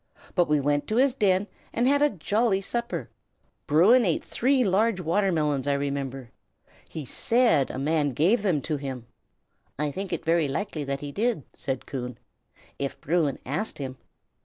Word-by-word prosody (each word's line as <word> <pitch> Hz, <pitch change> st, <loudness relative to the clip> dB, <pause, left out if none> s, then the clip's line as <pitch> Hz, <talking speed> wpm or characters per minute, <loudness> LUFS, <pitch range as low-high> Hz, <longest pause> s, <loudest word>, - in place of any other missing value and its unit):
But 175 Hz, -2 st, +3 dB
we 150 Hz, -1 st, +3 dB
went 145 Hz, +1 st, 0 dB
to 215 Hz, -, -1 dB
his 260 Hz, +1 st, +4 dB
den, 200 Hz, -5 st, +2 dB, 0.3 s
and 240 Hz, +2 st, +1 dB
had 285 Hz, +1 st, +3 dB
a 295 Hz, -, +5 dB
jolly 205 Hz, -, +1 dB
supper. 235 Hz, +4 st, -3 dB, 0.6 s
Bruin 195 Hz, -, +6 dB
ate 170 Hz, -7 st, 0 dB
three 260 Hz, +1 st, +2 dB
large 210 Hz, +1 st, +2 dB
watermelons, 160 Hz, -6 st, +1 dB
I 140 Hz, -, +3 dB
remember. 140 Hz, -3 st, -3 dB, 0.6 s
He 155 Hz, -3 st, -6 dB
said 230 Hz, -, +3 dB
a -, -, -5 dB
man 145 Hz, 0 st, +1 dB
gave 185 Hz, -, +3 dB
them 180 Hz, -8 st, +1 dB
to 155 Hz, +2 st, -2 dB
him." 135 Hz, -4 st, -6 dB, 0.7 s
"I 150 Hz, 0 st, -1 dB
think 195 Hz, +5 st, -5 dB
it 170 Hz, -1 st, -3 dB
very 165 Hz, -2 st, +3 dB
likely 155 Hz, +1 st, -3 dB
that 140 Hz, 0 st, -3 dB
he 145 Hz, -1 st, -5 dB
did," 220 Hz, -, 0 dB
said 135 Hz, -2 st, -4 dB
Coon, 125 Hz, -3 st, -5 dB, 0.6 s
"if 140 Hz, -1 st, -3 dB
Bruin 155 Hz, -3 st, 0 dB
asked 155 Hz, -, -3 dB
him." 130 Hz, -2 st, -5 dB
160 Hz, 165 wpm, -26 LUFS, 140-210 Hz, 0.7 s, Bruin